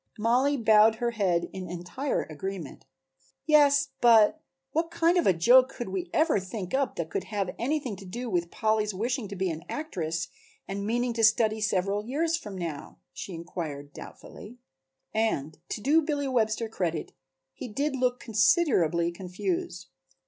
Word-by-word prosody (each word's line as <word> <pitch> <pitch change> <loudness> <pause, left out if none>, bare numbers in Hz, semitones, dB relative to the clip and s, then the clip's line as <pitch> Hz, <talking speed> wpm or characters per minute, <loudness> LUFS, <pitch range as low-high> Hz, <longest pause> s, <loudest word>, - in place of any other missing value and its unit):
Mollie 250 +6 +2
bowed 220 -1 +5
her 235 +1 -1
head 185 -6 0
in 185 -2 -6
entire 180 +11 -3
agreement. 170 +1 -7 0.6
"Yes, 290 -2 +5
but 235 +5 +5 0.3
what 330 +2 0
kind 335 +1 +2
of 350 - +2
a - - +7
joke 245 +10 +5
could 240 -6 -6
we 185 -2 -4
ever 315 -8 +2
think 185 0 -6
up 270 -1 0
that 160 -2 -4
could - - -2
have 200 -4 -2
anything 265 -3 -1
to 195 - -11
do 240 +7 -5
with 175 -5 -1
Polly's 215 -1 0
wishing 235 +3 -2
to 200 - -7
be 190 -1 -1
an 160 0 -6
actress 175 - -3 0.4
and 200 +1 -4
meaning 240 +2 0
to 225 0 -1
study 220 0 +3
several 200 0 0
years 315 +8 0
from 210 - -7
now?" 165 -5 -6 0.2
she 180 +6 -7
inquired 155 -4 -6
doubtfully. 230 +4 -11 0.6
And 160 -10 -1
to - - -3
do 300 +8 +4
Billy 290 -2 -2
Webster 230 -3 0
credit 175 -7 -3 0.4
he - - -7
did 275 +6 -2
look 250 -1 0
considerably 215 - +2
confused. 180 0 -4
215 Hz, 160 wpm, -27 LUFS, 180-255 Hz, 0.6 s, a